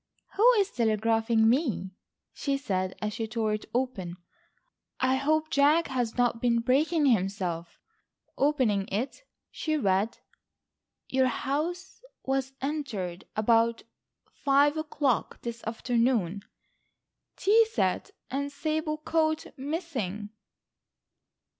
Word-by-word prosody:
"Who 460 +5 +7
is 410 -3 +2
telegraphing 225 0 +2
me," 225 - +1 0.4
she 280 -1 -1
said, 185 -8 -2
as 210 0 -1
she 225 +1 -3
tore 220 -1 -1
it 215 - -4
open. 230 -9 -2 0.8
"I 260 +1 +2
hope 310 +3 +1
Jack 295 +4 +4
has 245 -4 -2
not 240 -2 +1
been 235 -1 +2
breaking 295 +6 +2
himself." 185 -7 0 0.6
Opening 255 -9 +2
it, 245 - -3 0.3
she 310 -1 -1
read: 200 -2 +1 0.9
"Your 260 0 +2
house 325 - -3 0.2
was 270 0 -1
entered 230 - -3
about 230 +1 +2 0.5
five 285 +2 +3
o'clock 300 -5 -1
this 235 -1 -5
afternoon. 230 -4 0 0.9
Tea 440 +3 +4
set - - 0 0.2
and 280 +2 -2
sable 310 +2 -2
coat 315 0 0
missing." 260 - -4
255 Hz, 105 wpm, -28 LUFS, 220-300 Hz, 0.9 s, Who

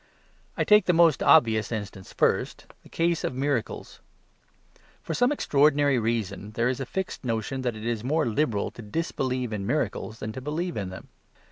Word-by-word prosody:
I - - +2
take 210 0 +5
the 180 - +3
most 165 -4 +4
obvious 110 -2 +4
instance 105 -3 -6
first, - - 0 0.2
the - - -18
case 170 0 0
of - - -2
miracles. 135 -3 -2 1.0
For - - -4
some 245 +2 +2
extraordinary 145 - +3
reason, 110 -2 -2
there 115 +3 +1
is 130 - -2
a 135 - -4
fixed 190 +4 -4
notion 115 +2 -2
that 125 -3 -2
it 110 +1 -8
is 115 -2 -2
more 150 +5 +1
liberal 115 -3 0
to - - -11
disbelieve 130 -1 -2
in 100 -2 -3
miracles 115 -4 -2
than 110 -1 -5
to 130 - -7
believe 165 +6 -3
in 100 -3 -3
them. 95 - -10
125 Hz, 175 wpm, -26 LUFS, 110-150 Hz, 1.0 s, take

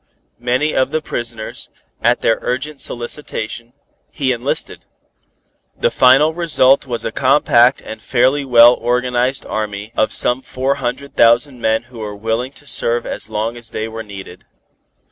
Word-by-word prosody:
Many 125 +5 0
of 130 0 +1
the 155 - -1
prisoners, 115 -6 -5 0.3
at - - +2
their 115 - +2
urgent 135 +4 -3
solicitation, 120 -2 -4 0.4
he 135 -4 -1
enlisted. 125 +3 -3 0.9
The - - +1
final 135 +5 +5
result 145 -6 +2
was 120 -2 -4
a 115 - -2
compact 130 -1 +3
and 110 0 -9
fairly 130 +4 +1
well 120 -2 +7
organized 125 +2 0
army 105 0 -5
of 110 - +1
some 125 +2 +1
four 130 +1 -1
hundred 135 +3 -4
thousand 120 +2 +3
men 110 +1 +1
who 120 -1 -14
were 105 -1 -6
willing 115 +5 -2
to 145 - -17
serve 120 -3 0
as - - -5
long 110 +2 -2
as 120 -2 -6
they 110 -1 -4
were 115 0 -7
needed. 95 -4 -10
120 Hz, 150 wpm, -17 LUFS, 115-130 Hz, 0.9 s, well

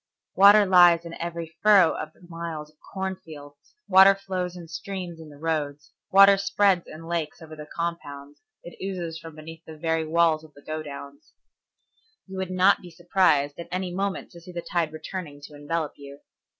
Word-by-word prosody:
Water 205 +1 +7
lies 175 -2 +6
in 170 - -8
every 170 -1 -5
furrow 200 -6 +6
of 155 - -6
the 180 - -20
miles 165 -3 -6
of 155 - -37
cornfields, 160 - -8
water 190 +1 +7
flows 185 -2 -4
in 170 -2 -10
streams 175 +1 -6
in 160 -1 -11
the 145 - -14
roads, 150 -2 -3 0.2
water 195 +1 +7
spreads 195 -2 +2
in 160 +1 -10
lakes 165 -3 -3
over 160 -1 -11
the 150 -1 -10
compounds, 145 -4 -6 0.2
it 175 - -11
oozes 175 -4 -4
from 165 -1 -11
beneath 160 +1 -11
the 160 -1 -11
very 160 +1 0
walls 160 0 +2
of 155 -2 -17
the 145 - -17
go 155 0 -4
downs. 140 -1 -10 0.9
You 190 -1 -9
would 190 -1 -3
not 185 +2 +3
be 180 - -11
surprised 165 -4 +1
at 170 - -7
any 185 -1 -3
moment 195 +1 -3
to 170 - -13
see 180 - -12
the 170 -1 -6
tide 170 -3 +1
returning 155 -2 -7
to 145 - -12
envelop 150 +2 -3
you. 140 0 -12
165 Hz, 185 wpm, -25 LUFS, 155-185 Hz, 0.9 s, Water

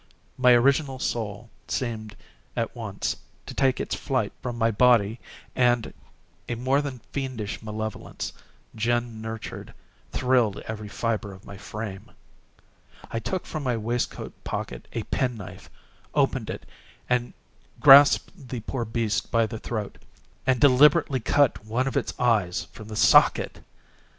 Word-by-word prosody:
My 125 -1 +6
original 135 +2 +3
soul 115 -3 -3 0.2
seemed, 110 -4 -3 0.4
at - - -2
once, - - -3 0.3
to - - -7
take 135 -2 +2
its - - -3
flight - - -1
from 120 -2 -4
my 115 0 +2
body 115 -1 +4 0.4
and 120 -2 +2 0.6
a 120 - -1
more 130 +4 +1
than 135 -5 -6
fiendish 130 -7 -4
malevolence, 110 -1 -5 0.4
gin 120 0 -1
nurtured, 110 0 -7 0.4
thrilled 125 -5 +2
every 110 -1 -5
fibre 110 -2 -2
of 95 - -15
my 100 - -9
frame. 105 0 -7 1.0
I 115 - -1
took 185 +9 -3
from 155 - -5
my 125 -4 0
waistcoat 115 +2 -3
pocket - - -5
a - - -2
pen 125 -3 -1
knife, 95 -2 -10 0.5
opened - - +1
it, - - -6 1.1
grasped 140 +3 +7
the 125 -3 -4
poor 120 +2 -3
beast 110 -1 -1
by 115 -1 +3
the 110 0 -6
throat, 110 -4 -5 0.5
and 130 -2 +3
deliberately 140 +2 +5
cut 140 0 +2
one 115 +4 -1
of 135 - -3
its - - -2
eyes 105 -9 +2
from 105 - -11
the 110 - -7
socket! - - +4
115 Hz, 135 wpm, -26 LUFS, 110-130 Hz, 1.1 s, grasped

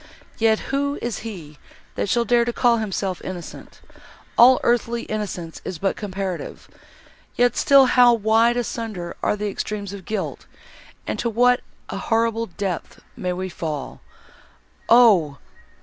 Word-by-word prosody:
Yet 220 -1 +4 0.2
who 280 +1 0
is 240 -2 -4
he, 170 -10 -9 0.3
that - - -2
shall 235 +3 +2
dare 240 +1 +3
to 240 - -1
call 235 -1 +2
himself 195 -4 -3
innocent!—all 230 +6 0
earthly 235 0 +1
innocence 195 -6 -5
is 185 - -5
but 195 +4 -1
comparative. 190 -3 -5 0.7
Yet 245 0 +2
still 275 -1 +6
how 245 -1 +5
wide 225 +2 +3
asunder 220 -7 -4
are - - +1
the 210 0 -3
extremes 200 -1 -5
of 195 -3 -9
guilt, 215 - -4 0.6
and - - -4
to 235 - 0
what 245 +2 +3 0.3
a - - -4
horrible 230 0 0
depth 185 -1 -5
may 180 - -3
we 185 +1 -4
fall! 155 -6 -5 0.9
Oh! 200 - +5
220 Hz, 135 wpm, -22 LUFS, 185-235 Hz, 0.9 s, still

